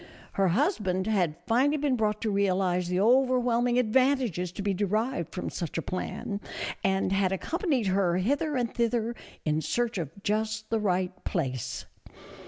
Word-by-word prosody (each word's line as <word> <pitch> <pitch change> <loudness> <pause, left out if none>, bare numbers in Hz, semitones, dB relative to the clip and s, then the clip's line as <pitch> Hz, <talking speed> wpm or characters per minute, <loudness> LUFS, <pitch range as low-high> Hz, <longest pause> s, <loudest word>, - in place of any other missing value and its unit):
Her 195 -1 +2
husband 190 - +1
had 185 -8 +1
finally 270 +6 +3
been 285 -3 +1
brought 215 -2 0
to 220 - 0
realize 185 -3 +1
the 180 +1 0
overwhelming 245 +1 +3
advantages 250 - +2
to 200 - -5
be 200 -1 +1
derived 210 - -1
from 180 - -4
such 170 -3 -4
a - - 0
plan, 200 +2 -4 0.4
and 190 -1 +1
had 195 -1 +2
accompanied 285 - 0
her 185 -2 +2
hither 285 - 0
and 240 -2 -1
thither 235 0 0 0.3
in 155 0 +1
search 235 +2 -1
of 160 -5 -3
just 215 +1 -1
the 225 - +2
right 185 -3 -1
place. 130 - -2
210 Hz, 155 wpm, -28 LUFS, 185-240 Hz, 0.4 s, finally